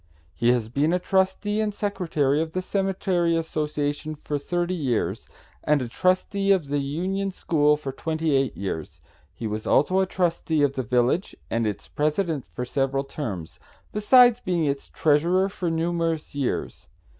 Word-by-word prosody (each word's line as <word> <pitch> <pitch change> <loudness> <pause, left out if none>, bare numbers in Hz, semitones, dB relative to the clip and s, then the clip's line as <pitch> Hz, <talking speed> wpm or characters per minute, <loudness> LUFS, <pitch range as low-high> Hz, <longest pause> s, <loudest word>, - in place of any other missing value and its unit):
He 120 - +1
has 120 -3 0
been 145 +8 +1
a - - +3
trustee 190 +3 0
and 210 -1 -2
secretary 160 -9 0
of 160 0 -4
the 185 - -1
Cemetery 185 -3 0
Association 150 -1 -2
for 150 0 -4
thirty 175 +4 -1
years, 135 -10 -1 0.3
and 150 -1 +3
a 125 - -3
trustee 185 - +1
of 175 -8 +2
the 145 0 +1
Union 185 +8 -2
School 150 -5 +2
for 140 -2 -5
twenty 160 +2 -1
eight 135 -2 0
years. 85 -6 -5 0.4
He 115 - -6
was 110 0 -3
also 185 +7 +3
a 190 - +2
trustee 170 -4 0
of 140 -1 +2
the 135 - -2
village 125 - +1 0.2
and 115 -1 +1
its 105 - -4
president 155 -1 -1
for 125 - -5
several 135 +1 0
terms, 105 - -6 0.3
besides 245 +3 +6
being 175 -7 0
its 140 -1 -2
treasurer 170 +6 +2
for 185 -3 -3
numerous 165 -1 -1
years. 140 -3 -3
155 Hz, 160 wpm, -25 LUFS, 140-185 Hz, 0.4 s, besides